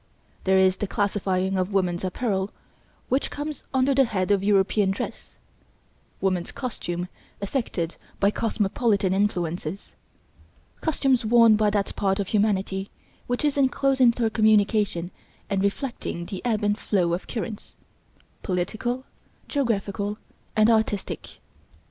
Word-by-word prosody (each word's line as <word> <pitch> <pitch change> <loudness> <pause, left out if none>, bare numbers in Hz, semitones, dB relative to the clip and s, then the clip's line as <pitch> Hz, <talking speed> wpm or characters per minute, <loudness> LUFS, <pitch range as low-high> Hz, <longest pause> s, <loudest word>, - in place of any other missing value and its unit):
There 190 0 +4
is 190 0 +4
the 205 - -2
classifying 190 -2 0
of 185 +2 -1
woman's 180 -3 0
apparel 190 0 -1 0.6
which 265 +2 0
comes 295 +1 -5
under 265 +1 +3
the 270 0 +5
head 200 -4 -1
of 200 -1 +3
European 200 0 +3
dress, 195 - -5 0.8
woman's 185 -3 0
costume 180 -8 -4 0.3
affected 200 -6 -2 0.2
by 200 +1 +4
cosmopolitan 210 -2 +1
influences; 180 -3 -2 0.9
costumes 270 -6 +2
worn 230 0 +6
by 210 0 +3
that 205 -1 -1
part 195 -1 +1
of 195 - -2
humanity 200 -2 0 0.4
which 245 +4 -1
is 290 -1 +1
in 265 -1 +5
close 275 0 +1
intercommunication 215 -6 +3 0.4
and 195 -1 +1
reflecting 200 -5 -2
the 185 0 -6
ebb 225 -3 0
and 205 +1 +1
flow 175 -5 +1
of 175 - -3
currents 220 -2 -5 0.7
political, 220 +7 -2 0.4
geographical 210 -6 -1 0.4
and 215 +1 +5
artistic. 220 -3 -1
205 Hz, 125 wpm, -25 LUFS, 190-230 Hz, 0.9 s, worn